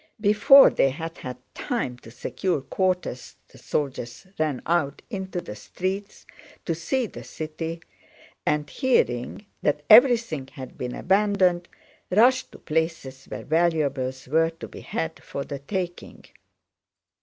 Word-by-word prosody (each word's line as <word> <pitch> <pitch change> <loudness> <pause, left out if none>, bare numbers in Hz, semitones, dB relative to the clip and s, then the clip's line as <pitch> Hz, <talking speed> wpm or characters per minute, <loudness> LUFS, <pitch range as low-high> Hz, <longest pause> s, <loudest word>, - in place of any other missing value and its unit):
Before 215 +7 +7
they 135 - +3
had 165 +5 -6
had 125 -1 -6 0.2
time 230 - -2
to 115 - -13
secure 145 +7 -2
quarters 180 -5 -2
the - - -17
soldiers 130 -1 -3
ran 150 -5 -1
out 165 -4 0
into 190 -3 -4
the 105 - -8
streets 190 - -5 0.4
to 170 - 0
see 205 +11 -1
the - - -9
city 160 +1 -6 0.6
and, 150 0 0
hearing 210 - 0 0.2
that 150 0 0
everything 230 - +6
had 130 -3 -9
been 125 -1 -5
abandoned, 190 -3 +2 0.4
rushed 250 +6 +4
to - - -10
places 155 -5 -3
where - - -7
valuables 145 -6 0
were 160 +4 +3
to 165 0 -10
be - - -11
had 160 0 -4
for 140 - -5
the 140 - -6
taking. 175 +4 -5
165 Hz, 130 wpm, -25 LUFS, 140-190 Hz, 0.6 s, Before